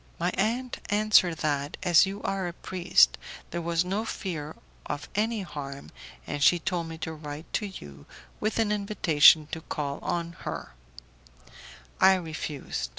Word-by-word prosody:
My 175 +2 0
aunt 235 +7 -1
answered 205 -5 +4
that, 145 -1 -1
as 175 +1 +6
you 200 +2 -6
are 195 -2 -1
a 175 - -5
priest, 180 +1 +3 0.3
there 170 - -3
was 170 +1 0
no 195 +4 -1
fear 165 -9 -5 0.3
of 145 -2 -4
any 215 0 0
harm, 140 -4 -8 0.3
and 145 - -4
she 175 - +6
told 170 0 -2
me 165 0 -7
to 160 - -5
write 150 0 -8
to 210 - -1
you 70 - -11 0.3
with 215 +1 -1
an 225 -2 +2
invitation 175 -7 +5
to 160 - -4
call 140 -3 -4
on 170 -1 -2
her; - - -6 1.3
I 190 0 +7
refused. 155 - -4
170 Hz, 155 wpm, -27 LUFS, 150-195 Hz, 1.3 s, I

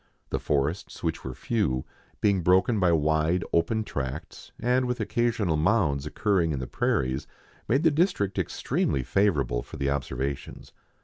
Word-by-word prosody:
The - - 0
forests, 75 +6 -2
which - - -2
were 65 -1 -5
few, 95 - -1 0.4
being 100 -3 +3
broken 95 +6 +3
by 90 -2 +4
wide, 80 +2 +2
open 110 +7 +2
tracts, 70 -5 -6
and 125 +2 +2
with 125 0 -2
occasional 110 -5 0
mounds 75 -5 +2
occurring 95 -2 +1
in 75 - -1
the 65 - -3
prairies, 65 +1 -1 0.4
made 135 +7 +2
the 160 - +5
district 145 - +1
extremely 65 - -1
favourable 70 -7 +1
for - - -10
the 70 0 0
observations. 70 0 -4
85 Hz, 145 wpm, -27 LUFS, 70-110 Hz, 0.4 s, the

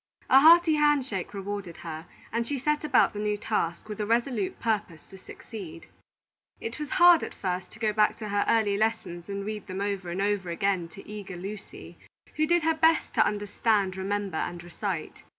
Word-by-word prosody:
A 265 - +9
hearty 330 +2 +7
hand 295 -3 +3
shake 195 -8 -4
rewarded 200 -3 -5
her, 160 +1 -6 0.3
and 230 0 -1
she 285 - -2
set 300 +4 0
about 285 -4 +3
the 205 - -5
new 210 0 0
task 175 -5 -2
with 210 -1 -7
a - - -1
resolute 230 -3 0
purpose 210 -8 -2
to 190 - -11
succeed. 180 -6 -10 0.7
It 450 -8 -6
was 300 -2 -4
hard 350 -2 +8
at - - -6
first 185 -1 -3
to - - -11
go 215 -1 0
back 210 0 +3
to 215 -2 -7
her 205 0 +1
early 215 -3 +2
lessons 205 -5 -2
and 200 0 -4
read 215 -1 -5
them 185 0 -5
over 200 -3 -2
and 175 +2 -3
over 200 -2 0
again 180 0 0
to - - -11
eager 205 -3 -7
Lucy, 200 +3 -9 0.4
who 310 0 +2
did 345 0 +3
her 325 +1 +3
best 320 0 +2
to - - +5
understand, 205 -1 0
remember, 195 -2 -2
and 175 +1 -3
recite. 175 -1 -5
205 Hz, 195 wpm, -27 LUFS, 190-235 Hz, 0.7 s, A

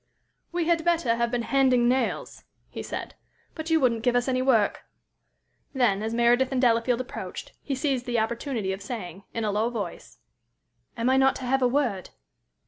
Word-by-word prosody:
"We 345 -1 -1
had 335 -1 +2
better 330 -8 +2
have 235 0 +1
been 240 -1 -1
handing 255 -2 +3
nails," 260 +2 -1 0.3
he - - -6
said, - - -6 0.4
"but 315 0 -6
you 325 0 +4
wouldn't 235 -5 +2
give 245 +1 +1
us 245 +1 +1
any 255 -1 +1
work." 235 -6 +2 0.9
Then, 235 -7 +2
as 220 +1 -2
Meredith 240 +3 +3
and 265 - 0
Delafield 240 0 +2
approached, 255 - -7
he 275 - -3
seized 265 -2 -1
the 240 -1 0
opportunity 225 -2 -1
of 190 - -7
saying, 200 -4 -7
in 230 - -1
a 210 - 0
low 215 +3 +1
voice: 205 -8 -6 0.8
"Am 230 +1 0
I 260 +1 +4
not 265 0 +4
to - - -7
have 270 +2 +1
a 250 - +4
word?" 245 -8 -1
245 Hz, 185 wpm, -26 LUFS, 230-265 Hz, 0.9 s, you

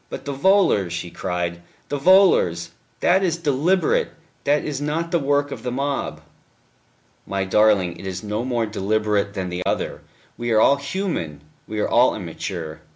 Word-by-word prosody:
"But - - -7
the 140 - -3
volors," 140 - +3
she 90 -1 -5
cried, 85 -1 -3 0.3
"the 145 - -2
volors! 135 - +4 0.3
That 185 +2 +4
is 170 -3 0
deliberate; 175 - +1 0.4
that 145 +1 +2
is 145 -2 -3
not 160 +3 -2
the 170 - +2
work 145 0 +1
of - - -6
the 125 - -3
mob." 140 +2 -2 1.1
"My 95 -1 -1
darling, 95 -3 +3
it 95 - -7
is 95 0 -5
no 105 +2 -2
more 120 -3 0
deliberate 105 0 -1
than 95 -2 -3
the 90 0 -4
other. - - -2 0.4
We 120 0 -2
are 110 - +5
all 140 +5 +5
human, 140 - -3 0.3
we 110 0 -4
are - - +1
all 120 +2 +4
immature. 85 -3 -6
120 Hz, 165 wpm, -22 LUFS, 95-145 Hz, 1.1 s, are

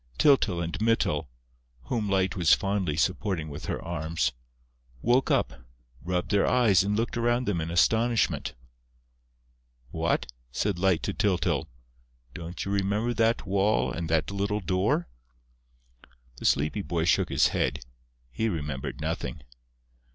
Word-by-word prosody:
Tyltyl 110 - +3
and 85 +5 -4
Mytyl, 95 - +1 0.5
whom 105 - -2
Light 95 0 +1
was 85 -4 +5
fondly 95 -6 -1
supporting 90 -1 0
with 70 - -7
her - - -2
arms, 80 -3 -2 0.7
woke 125 +3 +3
up, 65 - 0 0.4
rubbed 90 +2 -2
their 100 -1 +3
eyes 110 -8 +4
and 100 +1 0
looked 115 +1 -1
around 120 +1 +1
them 90 -7 0
in 80 - -3
astonishment. 115 - +2 1.4
"What?" - - 0 0.3
said 95 +6 -1
Light 95 -2 +2
to - - -2
Tyltyl. 95 -4 0 0.7
"Don't 85 +1 -6
you 100 +1 -1
know 105 +5 0
that 115 -1 +1
wall 95 -10 +1
and 85 +2 -4
that 80 +3 +1
little 100 +1 -1
door?" 90 -1 0 1.3
The - - -8
sleepy 75 +8 +2
boy 85 -3 -1
shook - - +2
his - - +3
head: 65 0 -1 0.5
he 110 - -1
remembered 75 -7 -4
nothing. - - -4
95 Hz, 135 wpm, -27 LUFS, 80-105 Hz, 1.4 s, was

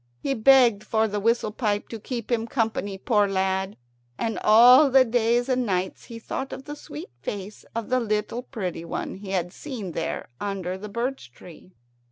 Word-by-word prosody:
He 275 - 0
begged 240 -3 +5
for 220 0 +1
the 205 0 -2
whistle 230 0 +1
pipe 210 -2 -1
to 225 - -6
keep 235 +1 -5
him 230 -1 0
company, 220 -5 -1
poor 210 0 +2
lad, 190 0 -1 0.4
and 225 -1 -2
all 250 +7 +7
the 265 0 +6
days 240 +1 +1
and 255 -1 +1
nights 190 -4 -2
he 230 - -9
thought 265 +4 -5
of 265 - -8
the 295 - -6
sweet 145 - -9
face 205 +4 -6
of 230 0 -3
the 255 0 +2
little 215 +1 -1
pretty 190 -10 -5
one 170 - -4
he 195 +1 -9
had 180 -2 -1
seen 235 -11 -6
there 165 -3 -4
under 195 -3 -3
the 205 +3 -8
birch 235 - -4
tree. 175 +7 -15
220 Hz, 185 wpm, -25 LUFS, 195-245 Hz, 0.4 s, all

